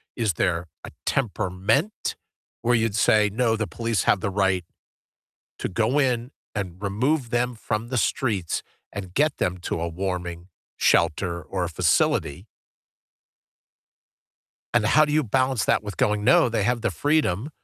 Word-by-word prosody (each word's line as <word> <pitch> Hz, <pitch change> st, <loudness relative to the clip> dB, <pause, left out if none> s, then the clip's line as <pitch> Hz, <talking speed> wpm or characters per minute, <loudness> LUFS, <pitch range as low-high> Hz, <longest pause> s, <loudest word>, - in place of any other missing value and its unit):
Is 110 Hz, -7 st, 0 dB
there 85 Hz, +1 st, 0 dB, 0.2 s
a -, -, -9 dB
temperament 110 Hz, -, 0 dB, 0.5 s
where 120 Hz, +1 st, +3 dB
you'd 115 Hz, -2 st, +1 dB
say, 105 Hz, -1 st, +4 dB
"No, 115 Hz, 0 st, +1 dB
the 110 Hz, -2 st, -2 dB
police 115 Hz, +5 st, -1 dB
have 100 Hz, -, +3 dB
the 100 Hz, -, -2 dB
right 95 Hz, -3 st, +1 dB, 0.9 s
to -, -, -2 dB
go 115 Hz, +9 st, +1 dB
in 125 Hz, -2 st, 0 dB, 0.2 s
and 95 Hz, -2 st, -4 dB
remove 125 Hz, +7 st, 0 dB
them 120 Hz, +1 st, 0 dB
from 110 Hz, +1 st, -3 dB
the 130 Hz, -, -1 dB
streets 105 Hz, -7 st, 0 dB, 0.3 s
and 95 Hz, -3 st, -7 dB
get 150 Hz, +6 st, +2 dB
them 90 Hz, 0 st, -1 dB
to 85 Hz, -, -3 dB
a 85 Hz, -, -2 dB
warming 90 Hz, 0 st, -4 dB, 0.3 s
shelter 85 Hz, +1 st, +2 dB
or 90 Hz, +4 st, -3 dB
a -, -, -4 dB
facility"? 85 Hz, +1 st, +1 dB, 2.3 s
And 120 Hz, -3 st, +3 dB
how 155 Hz, +8 st, +5 dB
do 150 Hz, -, -3 dB
you 155 Hz, +1 st, +3 dB
balance 130 Hz, -2 st, +1 dB
that -, -, +2 dB
with 105 Hz, -1 st, -7 dB
going, 105 Hz, 0 st, +1 dB
"No, 170 Hz, +5 st, +5 dB
they 115 Hz, -3 st, 0 dB
have 120 Hz, +2 st, 0 dB
the 120 Hz, -, 0 dB
freedom 145 Hz, -, +1 dB
105 Hz, 155 wpm, -24 LUFS, 90-120 Hz, 2.3 s, how